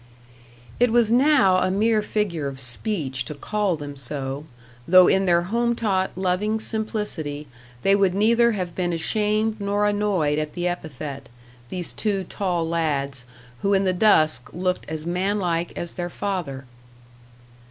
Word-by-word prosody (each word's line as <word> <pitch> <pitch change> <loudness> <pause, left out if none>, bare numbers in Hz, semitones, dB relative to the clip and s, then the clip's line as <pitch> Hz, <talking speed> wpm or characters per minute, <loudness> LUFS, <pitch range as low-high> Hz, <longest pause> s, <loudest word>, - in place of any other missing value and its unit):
It 245 -1 +4
was 230 -2 +3
now 255 -7 +5
a 185 - +1
mere 215 +3 +2
figure 200 -8 -2
of 135 -1 -6
speech 135 - -2
to 150 - -7
call 205 +4 -1
them 145 -2 -7
so, 135 +1 -2 0.4
though 185 +1 +8
in 190 0 +3
their 170 -1 +4
home 235 +5 0
taught, 195 -5 0
loving 190 +4 0
simplicity, 210 -10 -3 0.4
they 195 - +5
would 195 -2 +2
neither 230 +3 +4
have 180 -4 -3
been 175 -2 -1
ashamed 215 +5 0
nor 205 +1 +1
annoyed 200 -8 +1
at 155 0 -4
the 175 0 -2
epithet 150 -5 -5 0.4
these 180 -2 -4
two 200 -3 -1
tall 175 -3 -2
lads, 140 -6 -1 0.4
who 200 0 +2
in 195 - +2
the 185 -1 +1
dusk 155 - +3
looked 180 -1 -2
as 155 0 -4
man 185 +4 0
like 170 -3 -1
as 175 - -4
their 175 -1 -4
father. 170 -9 -4
185 Hz, 155 wpm, -23 LUFS, 155-210 Hz, 0.4 s, though